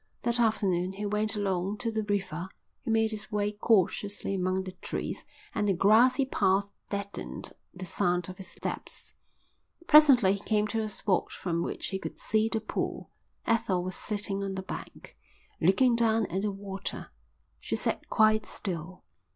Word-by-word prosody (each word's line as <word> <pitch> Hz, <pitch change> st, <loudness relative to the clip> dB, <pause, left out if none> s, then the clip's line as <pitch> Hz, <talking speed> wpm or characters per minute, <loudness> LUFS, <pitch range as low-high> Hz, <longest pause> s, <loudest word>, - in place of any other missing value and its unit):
That 235 Hz, 0 st, +1 dB
afternoon 190 Hz, -5 st, +1 dB
he 205 Hz, +2 st, -4 dB
went 210 Hz, +1 st, +1 dB
along 195 Hz, 0 st, -1 dB
to 230 Hz, -1 st, -2 dB
the 220 Hz, 0 st, -1 dB
river. 190 Hz, -4 st, -2 dB, 0.3 s
He -, -, -6 dB
made 225 Hz, 0 st, +3 dB
his 215 Hz, -1 st, -6 dB
way 210 Hz, 0 st, 0 dB
cautiously 205 Hz, -1 st, +1 dB
among 185 Hz, 0 st, 0 dB
the 185 Hz, -, -6 dB
trees -, -, -4 dB, 0.3 s
and 210 Hz, -1 st, 0 dB
the 195 Hz, -, +3 dB
grassy 240 Hz, +8 st, +5 dB
path 200 Hz, -4 st, +1 dB, 0.2 s
deadened 200 Hz, 0 st, -5 dB, 0.2 s
the 185 Hz, 0 st, -7 dB
sound 180 Hz, -1 st, 0 dB
of 185 Hz, 0 st, -8 dB
his 190 Hz, -, -8 dB
steps. -, -, -6 dB, 0.7 s
Presently 275 Hz, -, +7 dB
he 200 Hz, -, -3 dB
came 210 Hz, +1 st, +1 dB
to 225 Hz, +1 st, 0 dB
a 215 Hz, -, -2 dB
spot 195 Hz, -2 st, 0 dB
from 170 Hz, -2 st, -2 dB
which -, -, -3 dB
he 190 Hz, -, -3 dB
could -, -, -6 dB
see 220 Hz, +1 st, +1 dB
the 225 Hz, -, +1 dB
pool. 215 Hz, -, -4 dB, 0.3 s
Ethel 190 Hz, -5 st, +1 dB
was 185 Hz, 0 st, -3 dB
sitting 205 Hz, -2 st, -2 dB
on 195 Hz, -1 st, -3 dB
the 190 Hz, -, -4 dB
bank, -, -, -8 dB, 0.4 s
looking 235 Hz, +9 st, +4 dB
down 225 Hz, -2 st, +3 dB
at 190 Hz, +3 st, 0 dB
the 210 Hz, 0 st, 0 dB
water. 195 Hz, 0 st, -6 dB, 0.5 s
She -, -, -3 dB
sat -, -, -2 dB
quite 215 Hz, -1 st, +4 dB
still. 180 Hz, -1 st, -5 dB
205 Hz, 165 wpm, -29 LUFS, 190-220 Hz, 0.7 s, Presently